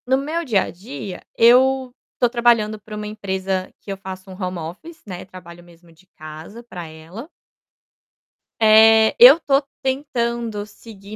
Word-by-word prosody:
No 260 +1 +2
meu 310 +5 -3
dia 220 - +1
a - - -7
dia, 180 0 -9 0.2
eu 255 +2 +4 0.3
tô 245 - +3
trabalhando 235 -3 +1
para 210 +1 -11
uma 210 0 -6
empresa 190 -2 -4
que 200 - -9
eu 195 - -5
faço 190 0 -10
home 185 -1 -5
office, 180 - -10
né, 185 -3 -8
trabalho 175 -2 -13
mesmo 170 0 -20
de 170 +3 -25
casa 155 +9 -11
pra 180 -8 -9
ela. 165 - -11 1.3
Eh, 220 0 +6
eu 260 +7 +9
tô 275 -3 +1 0.2
tentando 235 -5 -3
seguir, 210 -1 -13
210 Hz, 150 wpm, -20 LUFS, 185-240 Hz, 1.3 s, eu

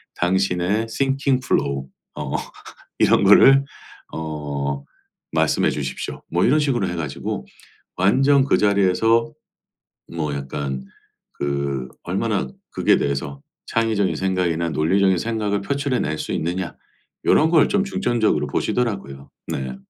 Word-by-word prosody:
당신의 95 +3 +1
thinking 135 +2 0
flow 70 -1 0 0.3
어 - - -5 0.7
이런 - - +4
거를 135 +1 +7 0.5
어 70 -3 -4 0.5
말씀해 - - +2
주십시오." 65 -3 -5
뭐 85 +2 +2
이런 155 - +4
식으로 125 -9 0
해 90 - -3
가지고 70 -4 -4 0.5
완전 135 +9 +4
그 - - +3
자리에서 105 +3 +2 0.8
뭐 75 -3 -2
약간 70 -1 -4 0.5
그 70 -2 -2 0.2
얼마나 - - -1 0.2
그게 - - +3
대해서 70 0 -3 0.3
'창의적인 110 -4 0
생각이나 90 -3 0
논리적인 95 +4 +2
생각을 105 -2 -1
표출해 140 0 -1
낼 75 +1 -2
수 - - -4
있느냐.' 90 +3 -3 0.5
요런 160 +2 +4
걸 160 -3 +5
좀 205 -1 +2
중점적으로 120 - 0
보시더라고요. 95 - -2 0.2
네. 65 -1 -4
95 Hz, 290 characters per minute, -22 LUFS, 70-115 Hz, 0.8 s, 거를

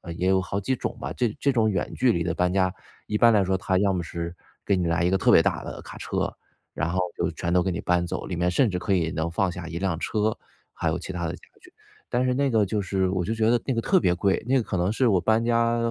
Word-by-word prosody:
也 90 +2 0
有 95 0 +3
好 95 +1 -4
几 100 +6 -1
种 - - -4
吧， - - -4
这 120 -4 -1
这 140 - +1
种 115 -4 +2
远 100 -2 -2
距 125 -3 +3
离 85 - 0
的 85 -1 -1
搬 90 +1 0
家， 95 -1 +2 0.3
一 105 - -1
般 115 +1 +6
来 100 -2 +4
说 95 0 0
它 95 0 0
要 100 0 +2
么 90 -2 -1
是 85 +1 -5 0.3
给 100 - +2
你 90 - 0
来 85 0 +1
一 90 - +3
个 95 - +2
特 - - +3
别 - - +7
大 - - -1
的 - - -7
卡 - - -10
车， - - -2 0.4
然 85 - -1
后 90 +1 0 0.2
就 - - 0
全 85 - -3
都 90 0 +4
给 95 0 -1
你 90 - -3
搬 90 0 +1
走， - - -4
里 90 - -4
面 90 +1 +1
甚 115 +6 +2
至 90 -2 -2
可 100 - -1
以 80 -3 +1
能 80 +1 -2
放 90 +2 0
下 85 -1 -7
一 85 0 -5
辆 95 -3 -1
车， 105 +3 -1 0.4
还 - - -3
有 - - +1
其 - - -7
他 85 -1 -3
的 85 - -3
家 90 - -10 0.2
具， - - -18 0.3
但 125 +1 0
是 125 - +2
那 140 +1 +1
个 110 -4 +3
就 105 +1 -1
是 95 -1 0
我 95 -2 -1
就 110 - -1
觉 110 0 +2
得 120 -1 +3
那 135 - 0
个 115 - 0
特 185 - +3
别 90 - +2
贵， 95 +1 +1
那 135 - +2
个 125 - +3
可 95 - -3
能 90 +2 +1
是 125 0 +2
我 95 - +3
搬 110 +5 +2
家 115 0 +2
95 Hz, 320 characters per minute, -25 LUFS, 90-110 Hz, 0.4 s, 别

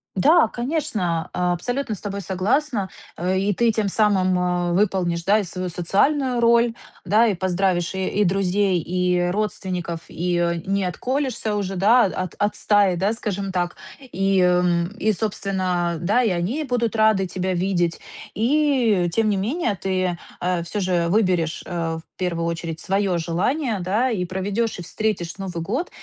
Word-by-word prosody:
Да, 275 - +5
конечно, 240 - -2
абсолютно 210 +8 -1
с - - -12
тобой 200 -1 -4
согласна. 200 - 0 0.3
И 190 +3 +1
ты 230 +3 +2
тем 215 -2 0
самым, 190 -3 +2
э, 180 -1 0
выполнишь, 180 -3 +1
да, 205 +4 +4
и - - -1
свою 185 +1 -4
социальную 245 - +1
роль, 235 0 +4 0.3
да. 215 +6 +4
И 205 - +1
поздравишь 185 -1 0
и 190 +2 0
друзей, 190 0 +1
и 180 +1 0
родственников, 180 -4 -3
и 175 -1 -1
не 195 0 0
отколешься 245 - -1
уже, 195 -2 -2
да, 225 +6 +5
от 185 -2 -3
от 205 0 +1
стаи, 205 -3 +3
да, 195 +5 +1
скажем 200 -4 -3
так. 175 -1 -1 0.2
И, 195 -7 0
эм, 180 -1 +2
и 215 0 +2
собственно, 185 -4 -1
да, 210 +8 +2
и 225 - +2
они 185 - -1
будут 235 -3 -1
рады 215 -3 +4
тебя 185 +1 -2
видеть. 175 -2 0 0.3
И 240 -6 +2
тем 225 +1 +2
не 200 - +1
менее, 225 - -1
ты, 185 -2 -1 0.2
э, 180 -1 0
всё 190 +5 -2
же 175 -2 +1
выберешь, 180 -5 +1
э, 165 -2 -3
в - - -48
первую 170 -2 -1
очередь 165 -1 -4
своё 195 -1 0
желание, 205 - -1
да. 210 +8 +1
И 190 -6 -1
проведёшь 195 +5 -2
и 175 - -5
встретишь 190 -3 -2
Новый 180 -4 -5
год 255 - -2
190 Hz, 155 wpm, -22 LUFS, 175-220 Hz, 0.3 s, Да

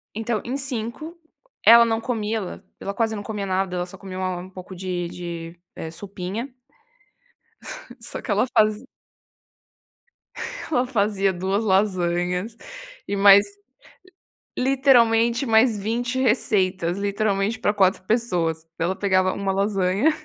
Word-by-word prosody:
Então 225 -1 -2
em 255 +3 -3
5, 270 +5 -4 0.5
ela 235 +1 +9
não 225 -1 0
comia 225 -2 -2
lá, 190 0 -8 0.2
ela 200 - -4
quase 225 +1 0
não 205 - -6
comia 210 -2 -4
nada, 190 -1 -1
ela 175 - -1
só 185 +2 -12
comia 190 0 -8
uma 185 -1 -2
um 185 - -10
pouco 185 0 -10
de 180 -1 -3
de, 170 -1 -7 0.2
eh, 160 - -6
sopinha. 200 +7 -6 1.5
Só 230 - -7
que - - -4
ela 205 +4 +3
fazi 215 +2 +3 1.9
ela 255 -4 +2
fazia 200 -5 +1
2 190 +4 -1
lasanhas 185 0 0 0.5
e - - -2
mais, 200 0 +7 1.1
literalmente 240 -3 +3
mais 225 -1 +4
20 240 +5 -2
receitas, 190 -7 +1
literalmente 200 +1 0
pra 210 -2 +1
4 190 -2 +2
pessoas, 175 -8 0
daí 165 - 0
ela 185 +2 -1
pegava 185 -2 +2
uma 200 -1 -2
lasanha 195 +6 +1
200 Hz, 135 wpm, -23 LUFS, 185-230 Hz, 1.9 s, ela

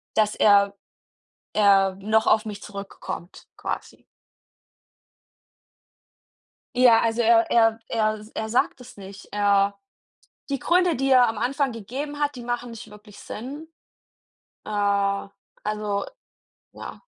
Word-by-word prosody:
dass 215 -1 +2
er 200 -1 +4 0.8
er 195 -2 +4
„noch 215 +2 +1
auf 215 +1 +3
mich 210 -1 -7
zurückkommt“ 200 -3 -8
quasi. - - -6 2.7
Ja, 245 -3 +6
also 230 +1 +1
er 230 0 +4
er 225 -1 +3
er 215 -1 0
s 215 - -14
er 220 0 -3
sagt 245 +2 0
das 250 -1 -14
nicht. 195 0 -11
Er 200 -1 +2 0.7
die 275 - -1
Gründe, 355 +2 +2
die 270 +2 -1
er 255 -2 +6
am 225 -2 -3
Anfang 270 +3 0
gegeben 265 +7 -6
hat, 290 -1 -1
die 245 - -8
machen 240 0 -3
nicht 230 -2 -10
wirklich 210 0 -15
Sinn. 280 +8 -8 1.0
Äh, - - -8
also, 200 0 -2 0.7
ja. - - -9
220 Hz, 120 wpm, -24 LUFS, 200-245 Hz, 2.7 s, Ja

